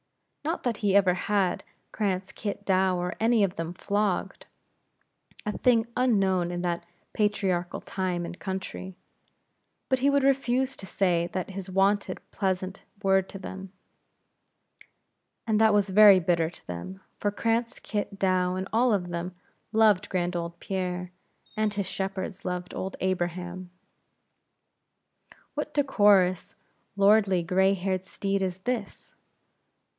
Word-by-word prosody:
Not 325 +4 -2
that 240 -4 -1
he 200 -2 +1
ever 190 -3 +5
had 190 0 0 0.3
Cranz, 190 -3 -2
Kit, 205 -1 -5
Douw, 190 -1 +3
or 180 0 -2
any 225 -1 +3
of 190 -2 0
them 165 +1 -4
flogged 205 0 -1 1.0
a 210 - -2
thing 230 -3 +3
unknown 195 -8 +2
in 175 0 -3
that 170 -1 -1 0.3
patriarchal 190 -4 0
time 180 -2 -2
and 175 +1 -8
country 190 -1 -5 0.9
but 260 -1 +2
he 275 +2 +3
would 280 -1 +3
refuse 265 -1 +2
to 190 - -9
say 175 -4 +1 0.2
his 195 -1 -7
wonted 195 0 +1
pleasant 190 -1 -2 0.2
word 190 -1 +3
to - - -7
them; 190 0 -8 1.7
and 220 -2 +2
that 220 -1 +6
was 205 -1 +2
very 205 -1 +8
bitter 165 -2 +1
to 170 - -15
them, 90 +2 -7 0.2
for 205 - +1
Cranz, 230 +3 -1
Kit, 205 -2 -4
Douw, 185 -1 +1
and 190 +1 -3
all 240 +1 +4
of 180 -3 -1
them, 175 +1 -4 0.4
loved 215 -4 +4
grand 180 -1 -1
old 170 0 -4
Pierre, 180 -2 -3 0.4
as 215 -1 0
his 200 -2 -1
shepherds 190 0 -4
loved 180 0 -4
old 190 +1 -4
Abraham. 180 0 -2 1.8
What 300 0 -4
decorous, 205 - +3 0.4
lordly, 200 -2 +4
gray 190 +2 +3
haired 185 0 -2
steed 195 +1 -2
is 185 -1 -1
this? 235 -2 -4
190 Hz, 135 wpm, -27 LUFS, 180-210 Hz, 1.8 s, very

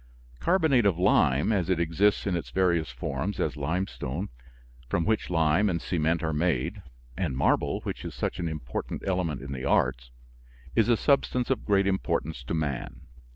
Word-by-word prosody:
Carbonate 160 - +3
of 90 -4 +1
lime 85 -2 +3
as 95 -5 0
it 90 -3 +2
exists 85 +5 +2
in 95 -3 0
its 85 - -4
various 85 -5 +1
forms, 70 +10 -3
as - - 0
limestone, 90 -1 -3 0.6
from 85 +6 0
which 110 0 0
lime 80 +4 +3
and 85 -2 0
cement 80 0 0
are 80 -1 0
made, 85 +5 0 0.3
and 65 +1 -2
marble, - - +1
which - - -5
is - - -6
such - - -3
an 85 - -1
important 75 -7 -5
element 90 -8 -1
in 70 - -7
the 65 -1 -5
arts - - +1 0.7
is 115 +1 +3
a 120 - +4
substance 130 -2 +1
of 130 - -1
great 100 -2 +3
importance 80 -7 -1
to 80 - -2
man. 70 -6 -3
85 Hz, 170 wpm, -27 LUFS, 75-100 Hz, 0.7 s, a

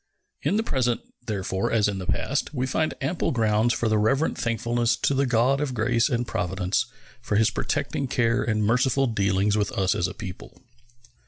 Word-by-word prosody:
In 205 - +1
the 220 - +1
present, 125 - 0 0.3
therefore, 95 -2 -2
as 110 -2 +3
in 100 -2 -2
the 90 - -6
past, 150 - -1
we 130 0 0
find 155 +4 -1
ample 150 +6 -1
grounds 110 -1 +2
for 120 - -1
reverent 110 +8 +2
thankfulness 115 +1 0
to - - +1
the 135 0 +1
God 125 +4 +2
of 135 -4 -2
grace 115 +2 +2
and 120 -2 0
providence 95 +7 -1 0.3
for 115 -4 -2
His 110 +1 +3
protecting 140 - -2
care 120 0 +1
and 110 -2 0
merciful 130 +4 +2
dealings 100 -3 +1
with 105 -2 0
us 95 -2 +1
as 85 - 0
a - - -8
people. 95 +5 -9
115 Hz, 180 wpm, -25 LUFS, 105-130 Hz, 0.3 s, as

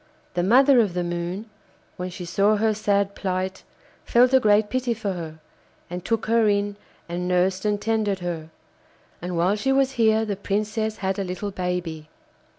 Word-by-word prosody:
The 175 - 0
mother 255 +7 +5
of 205 -6 +1
the 180 - 0
Moon, 175 +5 -4 0.5
when 180 0 -4
she 180 0 -7
saw 200 +5 +2
her 215 +1 +2
sad 200 -1 +1
plight, 190 -1 -3 0.4
felt 250 +2 +4
a 265 - +7
great 210 -2 +4
pity 255 0 -1
for 205 -3 -3
her, 160 -3 -7 0.5
and 180 0 -5
took 225 +1 -1
her 225 -1 +3
in 205 0 0 0.3
and 175 +1 -3
nursed 185 +2 +1
and 210 -1 +1
tended 215 -2 0
her. 170 -3 -5 0.7
And 175 0 -4
while 180 +4 +2
she 240 +6 0
was 270 0 +3
here 220 -3 +3
the 205 -2 -2
Princess 215 +2 -2
had 190 +1 0
a - - 0
little 185 +2 -4
baby. 180 -4 -4
200 Hz, 175 wpm, -24 LUFS, 180-220 Hz, 0.7 s, a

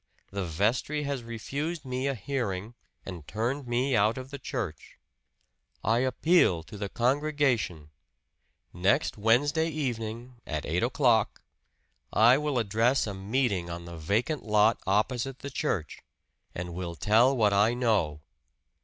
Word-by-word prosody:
The 100 0 -3
vestry 110 - 0
has 140 -3 -2
refused 140 +8 -4
me 130 +1 -2
a 135 - 0
hearing 110 -4 -3 0.3
and 85 -6 -8
turned 125 +5 -2
me 125 +2 +1
out 110 +2 +3
of 130 +1 -7
the 140 - -6
church. - - -5 0.9
I 115 +3 +2
appeal 130 - +3
to 95 - -12
the 100 -1 -4
congregation. 125 - 0 0.8
Next 90 +3 +1
Wednesday 145 +9 +2
evening, 120 -4 -4
at 75 -2 -3
eight 85 +4 0
o'clock, 120 -3 +2 0.7
I 120 +5 +5
will 150 -3 -1
address 115 +4 +2
a 105 - -4
meeting 100 -2 -1
on 85 0 -6
the 85 0 -8
vacant 110 - -1
lot 105 +1 +3
opposite 120 +6 0
the 140 +1 -7
church, 115 - -2 0.6
and 90 -1 -5
will 85 -1 -5
tell 115 +9 +4
what 105 -3 +3
I 105 +4 +3
know. 100 -12 +1
115 Hz, 135 wpm, -28 LUFS, 100-135 Hz, 0.9 s, I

